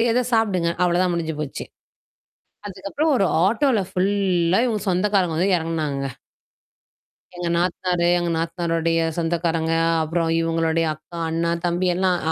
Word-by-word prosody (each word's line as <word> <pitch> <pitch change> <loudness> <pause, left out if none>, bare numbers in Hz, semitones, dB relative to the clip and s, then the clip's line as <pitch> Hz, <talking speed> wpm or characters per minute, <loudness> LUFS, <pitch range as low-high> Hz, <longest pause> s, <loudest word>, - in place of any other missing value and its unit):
ஏதோ 250 +2 +2
சாப்பிடுங்க. 190 -7 +1
அவ்ளதான் 180 +1 +2
முடிஞ்சு 160 -2 -2
போச்சு. 150 -3 -5 1.0
அதுக்கப்புறம் 200 - -2
ஒரு 195 - +2 0.2
ஆட்டோல 235 0 +2
ஃபுல்லா 185 -2 +1
இவுங்க 215 -4 -1
சொந்தக்காரங்க 185 -2 +1
வந்து 185 +3 +2
இறங்குனாங்கங்க. 155 -4 -2 1.3
எங்க 175 -1 -4
நாத்தனாரு, 175 0 0
எங்க 175 0 -1
நாத்தனாருடைய 165 0 -1 0.2
சொந்தக்காரங்க, 165 -1 0 0.3
அப்புறம் 165 +1 -1
இவுங்களுடைய 165 0 +1
அக்கா, 155 +2 -13
அண்ணா, 165 +1 0
தம்பி 175 +1 0
எல்லாம் 185 -1 +1
175 Hz, 115 wpm, -22 LUFS, 165-190 Hz, 1.3 s, ஏதோ